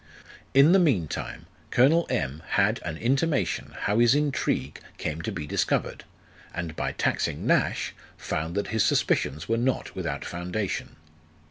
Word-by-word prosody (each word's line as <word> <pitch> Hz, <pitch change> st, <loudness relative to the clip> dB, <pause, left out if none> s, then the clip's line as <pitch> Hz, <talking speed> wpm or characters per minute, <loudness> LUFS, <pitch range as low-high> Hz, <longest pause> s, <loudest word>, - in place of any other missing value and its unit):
In 140 Hz, +4 st, +7 dB
the 190 Hz, -, +6 dB
mean 125 Hz, -, +3 dB
time -, -, -6 dB, 0.2 s
Colonel 155 Hz, +7 st, +4 dB
M. 75 Hz, -, -2 dB, 0.2 s
had 105 Hz, +3 st, +3 dB
an 80 Hz, -2 st, -4 dB
intimation 135 Hz, -, 0 dB
how 105 Hz, +3 st, +1 dB
his 120 Hz, +2 st, +5 dB
intrigue 145 Hz, -2 st, 0 dB, 0.2 s
came 80 Hz, +1 st, -3 dB
to 100 Hz, -, -3 dB
be 80 Hz, -7 st, -5 dB
discovered, 75 Hz, -, -1 dB, 0.5 s
and 85 Hz, -3 st, -4 dB
by -, -, -2 dB
taxing -, -, -1 dB
Nash, -, -, +1 dB, 0.2 s
found 80 Hz, +3 st, -3 dB
that 100 Hz, -, -1 dB
his 110 Hz, -1 st, +2 dB
suspicions 75 Hz, +4 st, +1 dB
were 115 Hz, -, +1 dB
not 125 Hz, +2 st, -1 dB
without -, -, -4 dB
foundation. 90 Hz, +3 st, -3 dB
110 Hz, 145 wpm, -26 LUFS, 85-130 Hz, 0.5 s, In